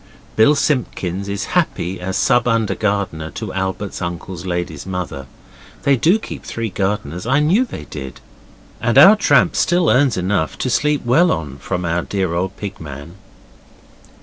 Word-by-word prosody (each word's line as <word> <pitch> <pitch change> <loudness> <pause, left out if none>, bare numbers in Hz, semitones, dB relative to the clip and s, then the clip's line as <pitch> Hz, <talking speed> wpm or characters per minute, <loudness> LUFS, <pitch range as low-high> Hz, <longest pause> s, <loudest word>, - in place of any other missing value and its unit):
Bill 125 +7 +5
Simpkins 100 - -1
is 100 0 -2
happy 90 +2 0
as 95 +2 -2
sub 120 -2 +3
under 115 -4 +1
gardener 100 -7 -2
to 110 -3 -5
Albert's 95 +1 -3
uncle's 90 +1 -5
lady's 85 -5 -3
mother. 90 -8 -5 0.6
They 140 - +4
do 165 - +3
keep 225 - -8
three 115 -2 -4
gardeners 95 -2 -2
I 135 +3 +3
knew 180 +12 +3
they - - -8
did. 70 -4 -8 0.6
And 120 +1 +1
our 190 +9 +9
tramp 210 -5 +3
still 175 -1 +2
earns 130 -3 +3
enough 90 -3 -1
to 130 - -2
sleep 150 +2 +1
well 165 +9 +4
on 70 - -3
from 90 +5 -3
our 85 +1 0
dear 95 -2 -2
old 95 +3 -2
Pig 100 -1 -6
man. 75 +2 -9
100 Hz, 160 wpm, -19 LUFS, 85-125 Hz, 0.6 s, our